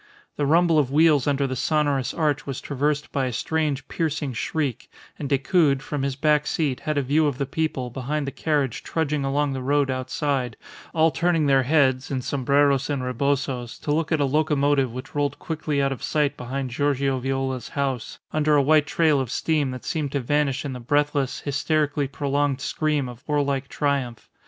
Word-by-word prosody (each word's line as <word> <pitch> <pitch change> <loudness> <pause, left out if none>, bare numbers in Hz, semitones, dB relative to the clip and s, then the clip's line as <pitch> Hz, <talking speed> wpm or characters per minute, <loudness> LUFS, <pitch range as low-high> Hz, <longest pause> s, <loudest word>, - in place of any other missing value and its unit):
The 145 - 0
rumble 165 +1 +4
of 140 -4 +1
wheels 150 -2 +4
under 140 -1 +1
the 130 -1 -2
sonorous 145 -3 +1
arch 150 -3 -1
was 135 -2 -3
traversed 145 +1 -1
by 135 -2 0
a - - -2
strange, 150 +3 -1
piercing 155 -4 -2
shriek, 135 +1 -2 0.3
and 140 - -4
Decoud, 140 0 +2
from 145 -2 -3
his 135 -1 -1
back 150 +1 +2
seat, 145 -6 0
had 155 -2 -2
a 140 - +2
view 150 +4 +2
of 140 -4 -2
the 140 - -1
people 135 -3 -2
behind 140 +4 -2
the 140 - -3
carriage 145 -6 -1
trudging 150 -3 -1
along 140 +1 0
the 130 - -4
road 140 +1 +1
outside, 130 -2 -2 0.4
all 160 0 +4
turning 170 -2 +1
their 135 -1 +4
heads, 130 -2 +2
in 130 -2 -2
sombreros 140 +1 +2
and 140 -3 -1
rebozos, 125 -1 -1
to 145 - -4
look 160 +2 -1
at 160 - +2
a 145 - +3
locomotive 145 -2 +2
which 130 +9 -8
rolled 145 -1 -1
quickly 160 -4 -2
out 135 - +1
of 135 - -5
sight 150 -2 0
behind 130 +1 -4
Giorgio 140 0 0
Viola's 135 -1 -2
house, 135 -4 -3 0.2
under 155 -1 +3
a 145 - +5
white 150 +1 +4
trail 155 -3 +3
of 130 - -4
steam 150 +1 0
that 130 0 -7
seemed 150 -4 -2
to 140 - +1
vanish 145 +1 0
in 140 - -3
the 125 - -6
breathless, 145 +1 0
hysterically 145 0 0
prolonged 140 0 -1
scream 150 -1 -1
of 125 +1 -10
warlike 140 -2 0
triumph. 135 -6 -2
140 Hz, 190 wpm, -24 LUFS, 135-150 Hz, 0.4 s, a